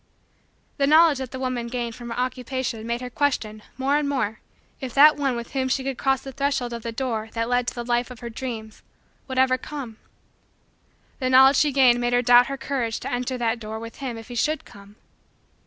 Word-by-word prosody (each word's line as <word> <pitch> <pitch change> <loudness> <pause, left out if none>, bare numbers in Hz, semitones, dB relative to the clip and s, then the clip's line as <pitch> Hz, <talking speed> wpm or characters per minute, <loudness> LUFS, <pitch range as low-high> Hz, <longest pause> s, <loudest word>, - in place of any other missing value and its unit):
The 275 -2 +2
knowledge 310 -2 +6
that 260 -2 -5
the 260 - -7
woman 255 -2 -2
gained 235 -1 -3
from 240 +1 -9
her 230 - -5
Occupation 250 -2 -3
made 235 +1 -2
her 250 - -5
question, 225 -7 -1 0.2
more 275 +2 +2
and 295 -1 -1
more, 230 -6 -1 0.4
if 260 -4 -6
that 295 +2 +8
one 275 -3 0
with 235 0 -6
whom 260 -1 -1
she 265 +1 0
could 270 -1 -4
cross 270 -1 +1
the 270 - -7
threshold 270 -2 -1
of 235 - -5
the 230 - -4
door 225 -2 -3
that 230 0 -1
led 245 0 +1
to - - -2
the 240 -1 -5
life 240 +1 0
of 250 -2 -10
her 235 - -5
dreams, 225 -3 -6 0.5
would 260 -1 -5
ever 255 0 +3
come. 260 -7 -7 1.2
The 255 -2 0
knowledge 265 +1 +7
she 295 - +3
gained 255 -3 +4
made 240 0 0
her 245 0 +3
doubt 245 +1 +6
her 275 - -4
courage 260 -4 -2
to - - -5
enter 250 +1 -2
that 235 -1 0
door 220 0 -6
with 230 +1 -9
him 255 -4 -5
if 225 +1 -11
he - - -7
should 305 +6 -1
come. 200 +1 -15
250 Hz, 220 wpm, -24 LUFS, 235-270 Hz, 1.2 s, that